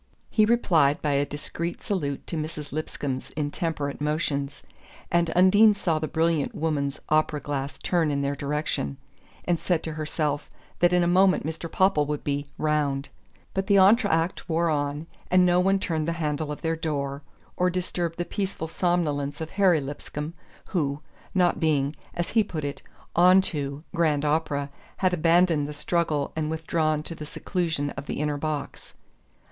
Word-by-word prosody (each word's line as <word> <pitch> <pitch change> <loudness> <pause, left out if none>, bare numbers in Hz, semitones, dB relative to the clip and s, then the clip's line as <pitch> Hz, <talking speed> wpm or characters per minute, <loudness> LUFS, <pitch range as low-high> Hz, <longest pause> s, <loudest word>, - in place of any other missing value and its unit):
He 215 - +4
replied 170 -11 +3
by 150 - +1
a 140 0 +1
discreet 170 +4 -5
salute 145 -9 -2
to - - -5
Mrs. 155 -1 -5
Lipscomb's 145 -3 -4
intemperate 145 -1 -2
motions, 150 -2 -1 0.5
and 170 -1 +3
Undine 205 +4 +6
saw 165 -5 0
the 155 - -2
brilliant 165 -2 0
woman's 145 -3 -1
opera 155 -1 +2
glass 140 0 -4
turn 170 -4 +1
in 140 -1 0
their 140 +1 0
direction, 140 - -2 0.5
and 175 -2 +1
said 170 -3 0
to 160 - -4
herself 150 -1 -2 0.3
that 175 0 +4
in 180 0 +4
a - - +2
moment 185 0 +4
Mr. 160 +1 -5
Popple 185 -6 +3
would 150 -1 -3
be 145 0 -2
"round." 145 -3 0 0.4
But 195 0 -1
the 200 - +4
entr'acte 190 -4 +3
wore 165 0 +2
on, 145 +1 -1 0.2
and 185 0 +5
no 175 0 +4
one 195 +2 +3
turned 160 -4 -2
the 170 - +1
handle 150 -2 -2
of 150 - -7
their 165 0 +1
door, 140 -3 -3 0.3
or 180 0 +2
disturbed 175 -2 -2
the 175 - -1
peaceful 195 -5 -3
somnolence 150 -5 0
of 160 -1 -5
Harry 190 -5 +4
Lipscomb, 150 +2 -6 0.4
who, 150 -6 -1 0.3
not 180 -2 +3
being 150 -2 +1 0.2
(as 175 - -2
he 220 -1 +3
put 160 -6 -5
it) 140 - -4 0.3
"onto" 170 -6 +3
grand 155 -3 +2
opera, 145 -2 0 0.3
had 185 -1 +2
abandoned 165 -2 +3
the 150 - -6
struggle 150 -1 0
and 155 -1 -1
withdrawn 155 -1 0
to 165 - -6
the 155 - -8
seclusion 160 -5 -2
of 140 +1 -8
the - - -3
inner 150 -1 0
box. 150 0 -5
155 Hz, 165 wpm, -26 LUFS, 145-175 Hz, 0.5 s, Undine